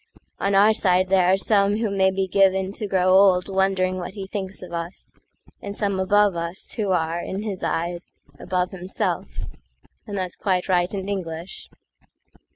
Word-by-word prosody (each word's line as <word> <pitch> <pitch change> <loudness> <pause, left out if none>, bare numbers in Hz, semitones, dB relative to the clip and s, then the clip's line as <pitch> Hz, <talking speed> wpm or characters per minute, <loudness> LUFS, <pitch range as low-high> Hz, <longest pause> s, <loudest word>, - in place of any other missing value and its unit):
On 200 0 +1
our 210 +3 +6
side 185 -3 +2
there 185 -2 +4
are 190 - +4
some 200 0 +2
who 220 -2 -1
may 190 -1 +3
be 190 0 -1
givenTo 195 +2 +1
grow 185 -1 +2
old 185 -1 +5
wondering 190 -1 +1
what 180 +3 -6
he 195 -2 -5
thinks 190 -1 -6
of 180 - -10
usAnd 175 +3 -8
some 200 -3 -1
above 205 0 +3
us, 170 +2 -3
who 210 -3 -2
are, 170 -2 0
in 190 +3 -4
his 200 -4 -4
eyes, 170 +1 -2 0.3
Above 180 0 -1
himself,—and 190 +2 -6
that's 185 -2 -3
quite 185 -2 -1
right 180 -1 +2
and 195 -1 -4
English. 175 -3 -5
190 Hz, 160 wpm, -23 LUFS, 180-200 Hz, 0.3 s, our